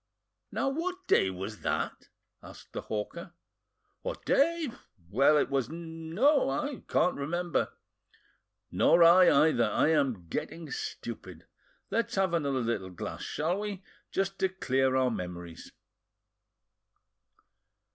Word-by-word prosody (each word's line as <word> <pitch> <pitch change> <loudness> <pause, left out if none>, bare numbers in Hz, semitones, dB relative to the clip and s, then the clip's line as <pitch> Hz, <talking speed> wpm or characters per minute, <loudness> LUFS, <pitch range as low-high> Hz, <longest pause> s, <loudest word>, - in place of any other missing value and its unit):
"Now, 275 - 0
what 365 +6 -3
day 95 - +4
was 95 +3 -6
that?" - - -3 0.3
asked - - -13
the - - -4
hawker. 170 +12 -5 0.7
"What - - -5
day? 330 +1 +2 0.4
Well, 135 +7 +5
it 145 - +1
was—no, 165 - +1
I 260 - -2
can't 180 - +2
remember." 170 +4 -1 1.0
"Nor 170 - +5
I 180 +2 +8 0.2
either; 120 -6 +2
I 130 - +2
am 135 - +1
getting 160 - -5
stupid. 435 0 -6 0.5
Let's 230 - 0
have 190 -3 +1
another 140 -5 0
little 115 -5 -2
glass 90 - -6
shall 165 +6 -1
we? 205 -2 -5 0.3
just 195 0 -1
to 190 - +2
clear 130 -8 +1
our 130 -1 +3
memories!" 90 -4 -7
160 Hz, 115 wpm, -30 LUFS, 130-195 Hz, 1.0 s, I